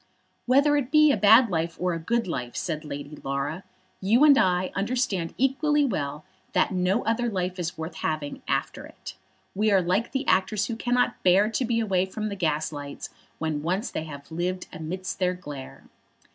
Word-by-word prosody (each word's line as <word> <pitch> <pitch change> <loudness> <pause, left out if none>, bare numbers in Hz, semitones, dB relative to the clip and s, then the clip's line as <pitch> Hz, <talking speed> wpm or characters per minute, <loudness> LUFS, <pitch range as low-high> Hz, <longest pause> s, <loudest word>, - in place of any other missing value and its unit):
"Whether 280 +4 +4
it 265 -3 -1
be 305 0 +6
a - - +3
bad 220 +2 +6
life 165 0 -1
or 180 0 0
a 165 - -3
good 230 +8 0
life," 125 -8 -4
said 160 -3 -3
Lady 145 0 -7
Laura, 140 +6 -3 0.4
"you 225 +8 +4
and 295 -2 +8
I 185 -4 +2
understand 195 -5 -1
equally 290 +3 +2
well 150 - -3 0.3
that - - +2
no 185 +4 +1
other 230 +2 +1
life 185 -2 -3
is 170 -1 -3
worth 160 +2 -5
having 155 -2 -3
after - - -2
it. - - -10 0.4
We 215 +2 +1
are 195 - +5
like 185 +6 0
the 275 0 -2
actors, 195 +3 +2
who 230 - -3
cannot 245 +1 0
bear 195 +4 +4
to 250 +3 0
be 230 0 0
away 190 -4 +1
from 215 +3 -4
the 200 - -4
gaslights 150 -4 -3 0.3
when 155 -2 -2
once 185 - -2
they 160 - -4
have 145 -1 -10
lived 180 +3 -2
amidst 185 +4 -5
their 180 -1 +1
glare." 145 -7 -9
185 Hz, 185 wpm, -26 LUFS, 160-230 Hz, 0.4 s, and